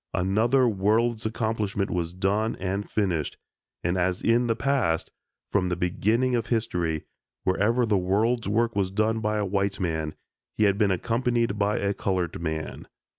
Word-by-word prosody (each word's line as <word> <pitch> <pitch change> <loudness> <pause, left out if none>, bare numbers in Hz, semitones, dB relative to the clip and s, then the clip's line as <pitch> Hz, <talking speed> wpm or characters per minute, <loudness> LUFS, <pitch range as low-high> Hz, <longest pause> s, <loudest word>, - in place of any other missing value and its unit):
Another 115 +8 +3
world's 110 +2 +1
accomplishment 110 -3 -1
was 85 -2 -1
done 100 +5 0
and 95 +2 -3
finished, 90 -8 -1 0.5
and 85 +2 0
as 90 +1 0
in 120 +1 +3
the 115 - +1
past, 120 -11 0 0.4
from 95 -3 +1
the 90 - 0
beginning 110 +8 +1
of 120 -2 0
history, 90 -9 -1 0.4
wherever 110 +6 +2
the 105 -3 +2
world's 110 +6 +1
work 115 +1 +1
was 100 -2 +1
done 110 +3 +1
by 105 -1 0
a 105 - 0
white 100 0 -1
man, 80 -4 -2 0.4
he - - +3
had 100 0 +3
been 105 -2 +4
accompanied 115 +2 0
by 105 +1 +1
a 100 0 0
colored 90 -5 -2
man. 80 -1 -4
100 Hz, 160 wpm, -26 LUFS, 90-115 Hz, 0.5 s, been